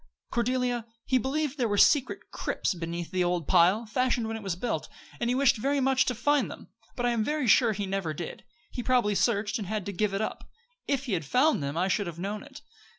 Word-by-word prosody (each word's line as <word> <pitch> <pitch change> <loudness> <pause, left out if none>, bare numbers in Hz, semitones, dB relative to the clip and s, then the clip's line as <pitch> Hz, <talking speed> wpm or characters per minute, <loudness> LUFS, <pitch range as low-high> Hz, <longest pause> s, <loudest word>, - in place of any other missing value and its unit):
"Cordelia, 245 -1 0 0.2
he 260 -1 +2
believed 285 +3 -2
there 240 - +2
were 205 -1 0
secret 285 +4 +3
crypts - - -1
beneath 170 0 -5
the 185 -1 +1
old 175 -3 -1
pile, 185 +5 +4
fashioned 245 +1 0
when 225 - -3
it 225 - -6
was 195 -4 -2
built, 180 -5 -3 0.3
and 235 - 0
he 250 - +2
wished 270 -1 +4
very 275 +6 0
much 265 -1 +3
to 250 - -1
find 285 +3 +2
them; - - -10 0.3
but 245 - -2
I 240 - +3
am 230 -2 +1
very 300 +2 -1
sure 230 +2 +5
he 200 0 -3
never 190 -4 -2
did 160 +2 -4
it. - - -22 0.3
He 245 - -4
probably 245 -4 +2
searched, 215 +2 +1
and 200 - -5
had 210 -1 -3
to 200 - -3
give 200 +1 0
it - - -1
up. 220 - -5 0.4
If 275 -2 0
he 240 - -2
had 165 -3 0
found 255 - +2
them 140 +2 -3
I 180 +2 +2
should 195 0 0
have 170 -1 -6
known 200 +4 -4
it. 285 0 -12
225 Hz, 240 wpm, -28 LUFS, 190-255 Hz, 0.4 s, sure